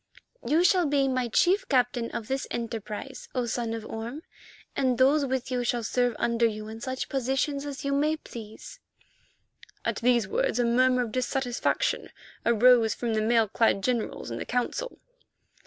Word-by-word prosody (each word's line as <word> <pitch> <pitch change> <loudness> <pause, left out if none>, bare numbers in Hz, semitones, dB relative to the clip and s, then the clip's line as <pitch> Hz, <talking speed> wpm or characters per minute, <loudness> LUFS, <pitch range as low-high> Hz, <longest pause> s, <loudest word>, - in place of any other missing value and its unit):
"You 320 +4 +2
shall 360 -2 +4
be 280 -1 +2
my 255 -2 0
chief 360 - +2
captain 245 -3 +1
for - - -4
this 265 +5 -3
enterprise, 230 +2 -5
O 250 -1 0
Son 235 0 -2
of 225 -1 -7
Orme, 235 +8 -6 0.5
and 255 -3 +1
those 275 +3 +4
with 260 -1 -2
you 250 -1 0
shall 240 -1 0
serve 245 +1 +1
under 235 0 +2
you 215 -1 -5
in 225 +1 -8
such 260 +1 -3
positions 275 +2 -1
as 280 -1 -6
you 280 - 0
may 300 +3 +1
please." 220 -7 -10 1.1
At - - 0
these 240 -3 +2
words 220 - 0
a 245 - +2
murmur 250 +1 +3
of 230 - -6
dissatisfaction 255 - -1 0.3
arose 235 0 +5
from 235 -2 -2
the 215 - +1
mail 225 0 +3
clad 200 -1 +2
generals 240 - -2
in 115 - -4
the - - -4
Council. - - -2
245 Hz, 170 wpm, -27 LUFS, 230-270 Hz, 1.1 s, arose